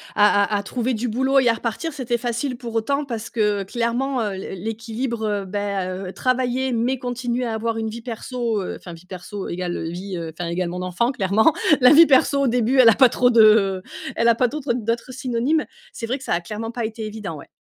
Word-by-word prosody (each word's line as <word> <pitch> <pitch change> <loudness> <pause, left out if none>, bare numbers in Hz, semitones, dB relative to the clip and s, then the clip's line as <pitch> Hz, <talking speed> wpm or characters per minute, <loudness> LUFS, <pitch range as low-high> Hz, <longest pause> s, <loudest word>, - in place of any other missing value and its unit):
à 205 -1 +5
à - - +3
à 200 - -3
trouver 245 +4 -2
du 235 +3 -2
boulot 265 +4 +2
et 250 - +2
à 230 - +5
repartir, 240 +8 -4
c'était 245 -4 -2
facile 240 +2 -3
pour 235 -2 -7
autant 280 +6 0
parce 230 -4 -5
que, 210 -3 0
clairement, 240 +5 -1
heu, 205 -3 -2
l'é 190 0 -6
l'équilibre, 225 +3 -4
heu, 205 -2 -1
bah, 200 -1 -2 0.2
heu, - - -6
travailler, 255 +1 0
mais 245 +3 0
continuer 245 0 -2
à 225 - -2
avoir 225 +1 -2
une 220 0 -2
vie 230 +2 -7
perso, 235 -2 -3
heu, - - -5
enfin, 175 - -11
vie 165 +2 -12
perso 190 +2 -7
égal 175 -2 -3
vie, 180 +2 -6
heu, 165 -1 -6
enfin, 175 -1 -3
égal 175 +1 -1
mon 180 +1 -5
enfant, 185 +9 0
clairement. 215 - +3 0.3
La 250 +3 +7
vie 330 +2 +9
perso, 280 0 +3
au - - +2
début, 245 +2 +1
elle 235 - +9
a 220 - +5
pas 260 - +7
trop 245 +1 +3
de 215 -5 +5 0.4
elle 230 - +2
a 230 - +5
pas 250 0 +2
d'autres 285 -4 -2
d'autres 235 +2 -3
synonymes. 260 +4 0 0.3
C'est 230 - -5
vrai 255 - -1
que 265 - -11
ça - - -1
a 175 - 0
clairement 220 +5 -5
pas 235 -1 -4
été 220 0 -4
évident, 210 -7 -6
ouais. - - -12
230 Hz, 230 wpm, -22 LUFS, 205-250 Hz, 0.4 s, vie